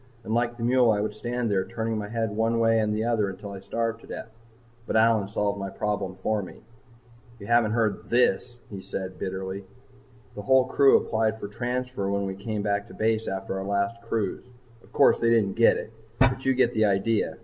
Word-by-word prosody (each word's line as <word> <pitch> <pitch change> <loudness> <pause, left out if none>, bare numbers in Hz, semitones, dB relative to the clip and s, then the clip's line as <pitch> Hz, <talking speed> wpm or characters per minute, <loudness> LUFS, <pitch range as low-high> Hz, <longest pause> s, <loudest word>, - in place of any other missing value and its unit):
And 110 - -3
like 120 0 0
the 115 - -5
mule 125 0 +4
I 105 -2 +2
would 105 0 -2
stand 120 -2 -2
there 95 -2 +2
turning 115 -1 -3
my 105 -1 -4
head 115 -1 -2
one 115 +2 0
way 115 0 +3
and 105 -1 +1
the 110 - -1
other 115 -4 +1
until 100 +1 -8
I 100 - -7
starved 115 +3 -3
to - - -15
death. - - -7 0.6
But - - -2
Allyn 110 -2 +4
solved 100 0 -1
my 95 0 -4
problem 100 -2 -3
for 105 +3 -1
me. 95 - -11 0.7
"You 100 - -10
haven't 115 -1 +3
heard 110 -3 -1
this," 120 0 +2 0.2
he 100 -2 -6
said 95 -1 -6
bitterly. 95 +1 -4 0.7
"The 105 - -6
whole 130 +4 +4
crew 135 +1 +5
applied 110 0 -1
for 100 - -5
transfer 125 -2 -3
when 100 0 -1
we 95 - -3
came 105 +2 -4
back 100 0 -1
to - - -13
base 110 0 0
after 95 0 -3
our - - -4
last 100 +3 -1
cruise. 115 -1 -3 0.3
Of - - -22
course, - - +4
they 115 - +2
didn't 110 -4 +3
get 115 +2 +4
it, - - -7 0.3
but 135 0 +2
you 130 - +3
get 125 -1 +2
the 110 0 +3
idea. 105 +2 +1
110 Hz, 215 wpm, -26 LUFS, 100-115 Hz, 0.7 s, crew